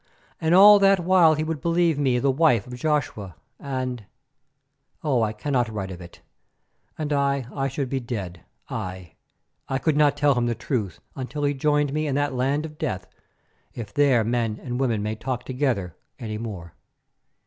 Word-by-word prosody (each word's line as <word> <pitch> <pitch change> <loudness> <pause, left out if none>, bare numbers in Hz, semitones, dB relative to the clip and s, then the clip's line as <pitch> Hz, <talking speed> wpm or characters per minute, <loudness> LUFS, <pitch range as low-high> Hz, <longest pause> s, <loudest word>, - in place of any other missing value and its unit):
And 160 +2 +2
all 205 +2 +9
that 195 -1 +5
while 175 -3 +5
he 155 - -1
would 155 -2 -3
believe 170 -3 +2
me 130 -4 +2
the 135 +3 +2
wife 130 -7 +3
of 125 - -10
Joshua, 125 - -2 0.2
and—oh! 135 - -6
I 110 -1 +1
cannot 125 +1 -1
write 100 -3 -5
of 90 -1 -8
it. 85 0 -13 0.8
And 150 -1 -2
I, 140 -2 +1
I 135 -1 -1
should 135 0 -3
be 135 +1 -2
dead; 100 -9 -6 0.3
I, 90 -2 -6 0.6
I 135 - 0
could 155 +2 0
not 145 -1 +3
tell 145 -1 +4
him 120 -2 0
the 120 - -1
truth 110 - -3 0.2
until 140 +3 -5
he 145 0 +2
joined 145 0 +1
me 155 0 -1
in 135 - -1
that 145 -1 0
land 135 +4 0
of 150 -1 -10
death, 95 0 -3 0.7
if 105 -4 -7
there 135 -5 +4
men 115 -1 -1
and 125 -1 -4
women 115 -6 0
can 110 0 -3
talk 125 0 -3
together 125 - -2 0.2
any 110 -2 -5
more. 95 -7 -7
135 Hz, 175 wpm, -24 LUFS, 115-145 Hz, 0.8 s, all